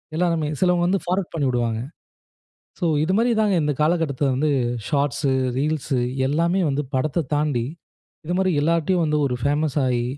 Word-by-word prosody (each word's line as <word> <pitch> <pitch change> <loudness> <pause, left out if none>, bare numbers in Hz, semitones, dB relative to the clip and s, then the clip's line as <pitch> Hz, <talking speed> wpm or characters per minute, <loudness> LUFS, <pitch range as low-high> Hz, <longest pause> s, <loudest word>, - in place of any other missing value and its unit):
எல்லாருமே 165 -3 +1
சிலவங்க 180 -1 +2
வந்து 195 +1 +1
ஃபார்வர்ட் 180 0 -2
பண்ணிவிடுவாங்க. 120 -7 0 1.0
சோ 175 - +1 0.2
இது 185 - 0
மாரி 240 +2 +2
தான் 210 -2 +2
இந்த 150 -1 +1
காலகட்டத்துல 150 -3 +1
வந்து 150 +2 +1 0.4
ஷார்ட்ஸ், 140 0 0 0.3
ரீல்ஸ் 150 -1 -1 0.3
எல்லாமே 170 +6 +1
வந்து 140 +2 -1
படத்த 145 +4 0
தாண்டி, 145 -5 0 0.6
இது 175 - -1
மாதிரி 190 0 +2
எல்லார்ட்டையும் 170 +2 +1
வந்து 150 -1 +1
ஒரு 125 - -1
பேமஸ் 145 +1 +1
ஆகி, 120 -1 0
155 Hz, 145 wpm, -22 LUFS, 140-175 Hz, 1.0 s, சிலவங்க